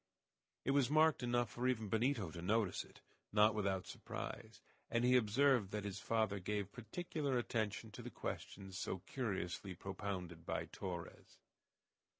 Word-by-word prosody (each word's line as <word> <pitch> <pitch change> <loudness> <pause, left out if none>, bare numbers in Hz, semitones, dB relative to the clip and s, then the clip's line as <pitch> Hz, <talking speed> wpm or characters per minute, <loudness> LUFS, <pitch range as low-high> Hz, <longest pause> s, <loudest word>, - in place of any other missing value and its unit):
It - - +3
was 140 -2 +4
marked 155 0 +5
enough 120 -2 +1
for 125 +1 -1
even 115 -4 +1
Benito 110 - +1
to 85 - -6
notice 105 +2 +2
it, - - -17 0.3
not 105 +1 +6
without 100 -3 0
surprise, - - -6 0.3
and 115 +1 +2
he 125 +1 +6
observed 125 -1 +4
that 105 0 -2
his 100 -1 -3
father 110 0 +1
gave 100 +1 -2
particular 140 - -2
attention 110 -2 -1
to - - -8
the - - -6
questions 95 -1 -5
so 95 - -3
curiously 95 -6 -2
propounded 95 -3 -4
by - - -1
Torres. 90 -3 -6
105 Hz, 150 wpm, -39 LUFS, 95-120 Hz, 0.3 s, not